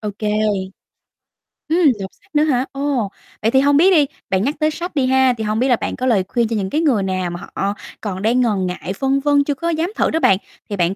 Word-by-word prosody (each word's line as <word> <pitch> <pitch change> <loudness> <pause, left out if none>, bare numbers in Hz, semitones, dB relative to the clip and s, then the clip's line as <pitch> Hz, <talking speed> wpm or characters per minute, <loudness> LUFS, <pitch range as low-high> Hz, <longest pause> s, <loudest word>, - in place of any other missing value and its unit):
Ô 210 -1 -3
kê. 210 - -2 1.4
Ừm, 330 +3 +2 0.2
đọc 190 -1 -5
sách - - -29
nữa 295 - +4
hả? 265 -4 +1
Ồ, 275 -7 -1 0.3
vậy 225 - +2
thì 265 - +4
hông 285 +1 +4
biết 370 +5 +5
đi, 310 -6 +5 0.2
bạn 190 0 +1
nhắc 285 +5 0
tới 310 0 +2
sách 345 +1 -6
đi 270 - +2
ha, 265 -1 +4
thì 220 - -3
hông 215 +1 -1
biết 260 - +2
là 245 - +4
bạn - - -4
có 255 - -3
lời 220 -7 +3
khuyên 235 0 0
cho 230 - -2
những 195 -3 -2
cái 310 +10 0
người 245 -11 +2
nào 185 -1 -2
mà 175 0 -6
họ 195 +2 -3 0.3
còn 190 -3 -4
đang 235 +4 +2
ngần 210 -6 +1
ngại, 180 +1 -4
phân 270 0 +1
vân 285 0 +3
chưa 290 0 -1
có 335 +5 -3
dám 335 +3 -1
thử - - +1
đó 320 - +1
bạn, 195 - +4 0.3
thì 205 - -2
bạn 180 0 0
250 Hz, 265 wpm, -19 LUFS, 200-290 Hz, 1.4 s, biết